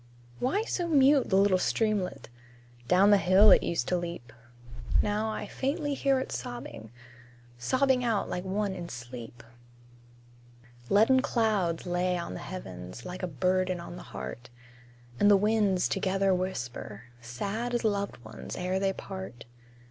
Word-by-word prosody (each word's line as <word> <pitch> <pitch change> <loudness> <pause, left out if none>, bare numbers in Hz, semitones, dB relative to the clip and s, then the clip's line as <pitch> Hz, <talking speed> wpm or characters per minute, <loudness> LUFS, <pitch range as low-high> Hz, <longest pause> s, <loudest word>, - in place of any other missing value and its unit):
Why 290 - +1
so 355 -6 -2
mute 280 -3 +4
the 190 - +2
little 195 -2 +4
streamlet? 200 - -1 0.6
Down 195 +3 +5
the 205 - +6
hill 190 +4 +6
it - - +7
used 165 -8 -1
to 180 - +2
leap; 170 -9 -6 0.7
Now 210 +1 0
I 220 - -4
faintly 290 +2 -2
hear 275 -1 +2
it 260 - -5
sobbing 120 -2 -6 0.7
Sobbing 260 - +2
out 225 -4 0
like 180 - -4
one 195 +1 -1
in 175 -2 -7
sleep. 120 -1 -9 1.5
Leaden 225 +6 +5
clouds 215 - 0
lay 180 0 0
on 170 - -5
the - - -6
heavens, 95 - -8
Like 180 +1 -6
a 185 - -1
burden 185 +4 0
on 170 - -8
the - - -9
heart; 65 - -7 0.7
And 205 - +5
the 205 - +7
winds 205 -3 +2
together 195 0 +1
whisper, 125 - -4 0.2
Sad 200 - -3
as 240 - -1
loved 200 -2 -1
ones 110 0 -8
ere 185 +1 -1
they 195 0 +1
part. 190 -12 -8
190 Hz, 150 wpm, -29 LUFS, 170-220 Hz, 1.5 s, it